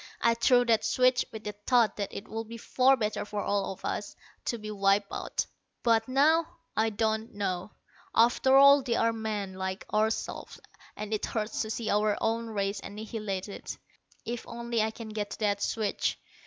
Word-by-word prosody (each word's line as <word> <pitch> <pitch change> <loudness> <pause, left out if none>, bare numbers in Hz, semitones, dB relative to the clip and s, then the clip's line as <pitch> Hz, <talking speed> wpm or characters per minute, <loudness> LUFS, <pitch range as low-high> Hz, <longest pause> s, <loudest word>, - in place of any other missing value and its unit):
I 235 - +4
threw 245 +1 +4
that 225 -2 +3
switch 255 0 +3
with 220 -1 -8
the 210 - -3 0.2
thought 240 -4 +4
that 200 -2 -3
it 200 - -7
would 225 0 -5
be 230 +1 -8
far 260 +4 +3
better 215 -2 -1
for 210 0 -4
all 200 -1 0
of 190 - -9
us 205 - -3 0.3
to 235 - -1
be 215 -1 -7
wiped 200 0 +2
out. - - -2 0.4
But 225 -2 +3
now, 310 +6 +3 0.2
I 220 +1 +2
don't 220 +1 -1
know. 190 -1 -3 0.4
After 245 +3 +5
all, 280 +1 +8
they 245 -3 -1
are 230 0 +2
men, 215 -3 -3
like 190 +1 -4
ourselves, 220 +1 -1 0.4
and 210 +1 -5
it 215 - -1
hurts 215 -1 -2
to 220 - -3
see 220 0 -2
our 210 0 +2
own 230 +1 0
race 200 -2 -2
annihilated. 210 -2 -5 0.5
If 240 0 -5
only 235 -1 -2
I 220 - +1
can 220 0 -8
get 210 -1 -3
to - - -8
that 205 -1 +1
switch." 215 -1 -1
220 Hz, 180 wpm, -29 LUFS, 205-235 Hz, 0.5 s, all